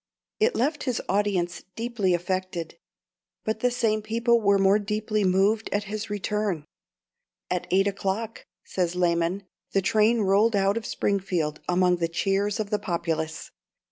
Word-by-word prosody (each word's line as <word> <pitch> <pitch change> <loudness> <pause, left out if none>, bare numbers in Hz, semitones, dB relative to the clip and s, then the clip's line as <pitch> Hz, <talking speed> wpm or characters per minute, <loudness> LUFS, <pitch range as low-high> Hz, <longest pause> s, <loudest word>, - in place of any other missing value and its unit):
It 450 +3 +3
left 295 +5 0
his 250 -4 0
audience 195 -3 0
deeply 225 -6 0
affected; 180 -2 -3 0.7
but 220 0 -1
the 250 - +2
same 225 -3 0
people 230 +2 +2
were 200 -1 +4
more 195 +1 +4
deeply 215 0 -1
moved 195 +4 +2
at 205 0 0
his 210 +1 -5
return. 205 -5 -2 0.9
"At 180 -1 -1
eight 195 +2 +3
o'clock," 200 +3 -3 0.2
says 180 -2 -2
Lamon, 175 +2 +1 0.3
"the 195 - +3
train 220 +3 +3
rolled 205 +3 +3
out 195 0 +2
of 230 -2 -3
Springfield 180 -6 -1
amid 180 0 +3
the 165 - +1
cheers 195 +5 0
of 210 -1 -3
the 210 - +1
populace. 165 -3 -3
200 Hz, 145 wpm, -26 LUFS, 180-215 Hz, 0.9 s, were